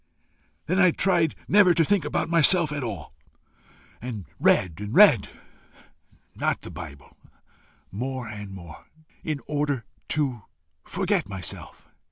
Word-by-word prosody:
I 170 - 0
then 185 -3 +5
tried 170 -5 +2
never 195 -4 +5
to 165 -1 +4
think 200 -5 +1
about 150 - -1
myself 170 -1 +4
at 145 -2 -3
all, 105 -10 -6 0.9
and 110 -6 -6
read 85 -3 +2
and 105 +3 -5
read 185 - +7 1.0
not - - -1
the - - -8
bible 70 0 -10 0.8
more 125 +3 -4
and 105 -2 -7
more, 85 -4 -11 0.4
in 150 -3 -3
order 145 -4 -1 0.2
to 135 -7 -1 0.4
forget - - -1
myself. 95 -3 -7
140 Hz, 125 wpm, -25 LUFS, 105-165 Hz, 1.0 s, read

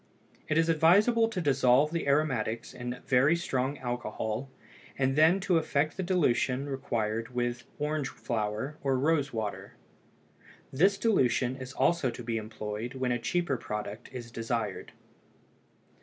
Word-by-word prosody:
It 155 - +1
is 165 0 +3
advisable 200 +9 +4
to 215 - -3
dissolve 140 -1 +3
the 165 -3 -2
aromatics 125 -6 0
in 125 0 -6
very 135 +5 +4
strong 140 -5 -1
alcohol 120 0 -3 0.5
and 135 0 +1
then 160 +5 +5
to 180 -3 +3
effect 150 -1 0
the - - -3
dilution 140 -7 +1
required 115 -3 -2
with 120 0 -2
orange 150 -1 -1
flower 115 +5 -3
or 135 -2 +1
rose 145 0 +1
water. 110 -3 -5 1.0
This 190 +9 +4
dilution 130 - +2
is 130 -1 -8
also 170 -5 +2
to 120 - -7
be 115 -1 -2
employed 110 +2 -5
when 130 -1 -1
a 120 - 0
cheaper 145 +3 0
product 105 +1 -6
is 120 -2 -8
desired. 115 -3 -3
130 Hz, 140 wpm, -29 LUFS, 120-155 Hz, 1.0 s, then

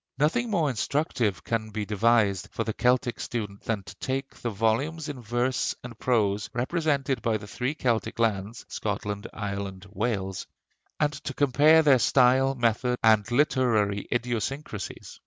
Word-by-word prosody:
Nothing 170 - +1
more 170 -8 +1
instructive 125 - -1
can 110 -2 -2
be 105 -1 -3
devised 105 -2 +2
for 115 - -2
the 110 - -3
Celtic 125 -1 +1
student 105 -4 -4
than 110 -4 -2
to - - -10
take 135 +1 -3
the 120 - -4
volumes 115 +10 0
in 135 -4 -6
verse 120 +3 0
and 125 -2 -8
prose 105 -4 +1
representing 140 0 0
the 110 -1 -1
three 125 +7 -3
Celtic 120 -6 -1
lands, 110 -1 -1
Scotland, 105 +1 -3
Ireland, 100 -2 -5
Wales, 100 -3 -2 0.5
and 150 -1 +2
to 140 -2 -6
compare 150 +4 +5
their 140 -4 +5
style, 130 +2 +4
method, 125 +1 +1
and 110 -1 +4
literary 120 -7 +2
idiosyncrasies. 120 -1 -3
120 Hz, 140 wpm, -27 LUFS, 105-135 Hz, 0.5 s, compare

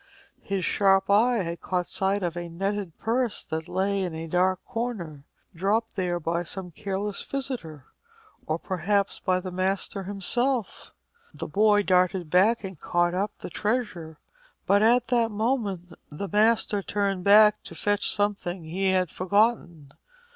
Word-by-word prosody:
His 195 -3 -2
sharp 195 -1 +3
eye 225 +1 +4
had 170 -1 -5
caught 180 -1 -1
sight 195 +2 -1
of 175 -1 -2
a 175 0 -5
netted 195 0 -3
purse 235 0 -1
which 160 +1 -4
lay 195 +2 0
in 180 -4 -3
a 160 +1 -5
dark 180 +2 +1
corner, 210 - -5 0.3
dropped 205 +6 0
there 180 -3 -1
by 170 +1 -1
some 180 +1 -6
careless 200 +4 -3
visitor, 240 - -5 0.6
or 155 - 0
perhaps 195 +3 -1
by 185 -1 +1
the 185 0 -6
master 190 +1 -2
himself. 230 +4 -2 0.4
The - - -5
boy 205 0 +3
darted 180 -3 +1
back 210 +6 +4
and 190 -5 -7
caught 175 0 +1
up 200 +3 -2
the - - -8
treasure; 205 -9 -2 0.5
but 200 +1 +4
at 240 +2 +3
that 235 -2 +2
moment 210 -5 -2 0.2
the 155 +7 -5
master 210 0 +2
turned 195 -2 -1
back 210 +2 +6
to - - -10
fetch 205 0 0
something 195 -4 -1
he 185 +5 -1
had 185 -3 +1
forgotten. 185 -7 0
195 Hz, 150 wpm, -26 LUFS, 175-210 Hz, 0.6 s, back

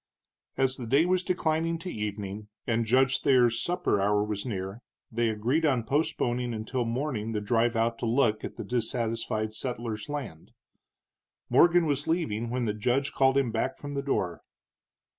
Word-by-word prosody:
As 130 0 +1
the 120 - -6
day 140 +7 +4
was 185 0 +2
declining 165 -2 0
to 175 +2 -6
evening, 105 -1 -4 0.2
and 115 -1 0
Judge 130 +2 +3
Thayer's 120 -4 +4
supper 175 - 0
hour 105 +1 +2
was 105 +2 -3
near, 95 0 -4 0.3
they 115 0 +1
agreed 120 +9 0
on 130 -7 +2
postponing 125 -3 0
until 120 +3 -2
morning 115 -2 -2
the 105 - 0
drive 115 +3 +1
out 115 0 +1
to 120 - -2
look 115 -3 +2
at - - -6
the - - -5
dissatisfied 115 -2 -2
settler's 115 -2 -4
land. 130 - -6 1.0
Morgan 175 0 +6
was 145 -1 -1
leaving 120 -10 -1
when 125 0 -1
the 105 - 0
judge 125 +7 0
called 135 0 +3
him 135 -4 +2
back 115 +4 -1
from 145 0 -7
the 140 - -1
door. 95 -11 -1
120 Hz, 165 wpm, -28 LUFS, 110-140 Hz, 1.0 s, Morgan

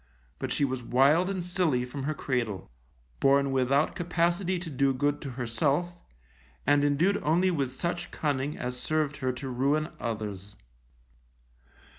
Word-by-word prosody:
But - - -3
she 145 - +2
was 130 -2 -3
wild 140 +9 +3
and 190 -3 -2
silly 175 -8 +1
from 135 +2 -6
her 155 +1 -1
cradle, 120 - -2 0.5
born 140 0 +4
without 135 +3 +2
capacity 175 +1 0
to 170 -1 -5
do 135 0 +2
good 145 +2 0
to 140 - -5
herself, 135 +8 -1 0.7
and 145 +1 +4
indued 165 +8 +2
only 175 +5 +3
with 140 -6 -1
such 175 +5 -2
cunning 145 -1 -2
as 125 0 -4
served 155 -1 -1
her 130 -3 0
to 135 +2 -6
ruin 140 +5 +1
others. 105 -3 -5
140 Hz, 145 wpm, -28 LUFS, 130-165 Hz, 0.7 s, born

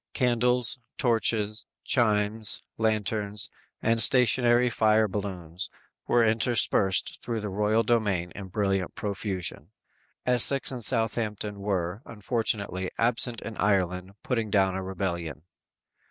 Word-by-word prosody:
Candles, 125 -1 +1 0.2
torches, 110 -4 0 0.2
chimes, 105 -2 +2 0.2
lanterns 105 -1 0 0.3
and 115 0 +2
stationary 120 +1 +4
fire 110 -2 +3
balloons 95 -4 -5 0.4
were 120 -1 +3
interspersed 110 -3 +1
through 115 -2 -3
the 105 -2 -5
royal 105 +3 +1
domain 100 -7 0
in 100 -2 -8
brilliant 95 -1 -1
profusion. 100 -4 -4 0.6
Essex 125 +3 +3
and 125 -3 -5
Southampton 110 -3 0
were, 95 0 -2
unfortunately, 105 -4 -2
absent 115 0 +2
in 110 - -7
Ireland 95 -2 0
putting 115 -4 -1
down 95 -2 +2
a 95 - -3
rebellion. 85 -5 -4
105 Hz, 110 wpm, -27 LUFS, 95-115 Hz, 0.6 s, stationary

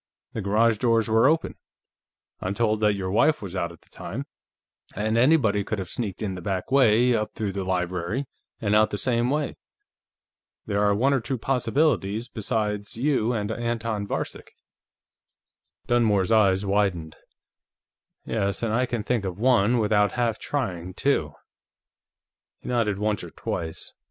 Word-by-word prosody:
The 110 - -3
garage 105 +2 +2
doors 115 -3 +2
were 115 +3 +4
open 160 +2 +1 0.8
I'm 95 +2 -3
told 110 -1 +1
that 105 -1 +3
your 95 -1 -3
wife 150 +9 +3
was 95 -3 -7
out 85 -2 -2
at 85 - -16
the - - -27
time - - -6 0.7
and 110 +2 0
anybody 115 -5 +3
could 110 - -3
have 95 -3 -5
sneaked 110 -3 -4
in 100 -3 -2
the 90 - -7
back 95 +4 -3
way, 125 -2 +4
up 105 -1 -2
through 105 -3 -2
the 95 0 -3
library, 90 +6 -2 0.3
and 105 -2 0
out 110 0 +5
the 105 - -3
same 120 +3 +1
way. 150 +1 -1 1.1
There 100 -1 0
are 100 -1 +3
one 135 +7 +2
or 135 - +2
two 130 +3 -3
possibilities 120 - 0
besides 105 -2 -3
you 125 -3 +1
and 105 -3 -2
Anton 115 -3 -2
Varcek." - - -4 1.4
Dunmore's 110 -5 +2
eyes 100 -3 +4
widened. 95 -5 0 1.1
"Yes, 100 0 -1
and 110 -2 0
I 125 +2 +1
can 120 -3 -3
think 120 -2 0
of 95 -2 -4
one, 120 0 +3
without 105 -2 +2
half 120 -3 0
trying, 95 -10 -3
too!" 80 - 0 1.2
He - - -13
nodded 115 -5 +1
once 105 0 -1
or - - -7
twice. 80 -1 -4
110 Hz, 155 wpm, -25 LUFS, 100-120 Hz, 1.4 s, out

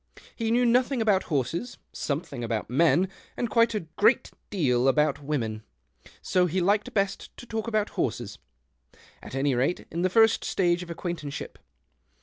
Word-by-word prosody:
He 225 -2 -2
knew 245 +2 +3
nothing 250 +2 +2
about 210 -4 +2
horses, 165 - -2 0.2
something 145 -4 -3
about 115 -1 -3
men, 170 +6 +4 0.3
and 240 - -2
quite 230 -1 +3
a 210 - 0
great 205 +9 +2 0.2
deal 130 - +1
about 150 +2 +2
women; 120 -7 -2 0.6
so 180 -1 +2
he 180 +3 -1
liked 200 +4 +1
best 195 -1 -1
to - - -10
talk 225 -1 -4
about 215 -2 0
horses 110 -3 -3 0.4
— - - -27
at - - -9
any 135 +1 +1
rate, 130 +8 0
in 170 - -2
the 185 - +2
first 225 +3 +4
stage 175 -2 +1
of 180 - -8
acquaintanceship. 170 -4 -5
175 Hz, 160 wpm, -27 LUFS, 140-215 Hz, 0.6 s, men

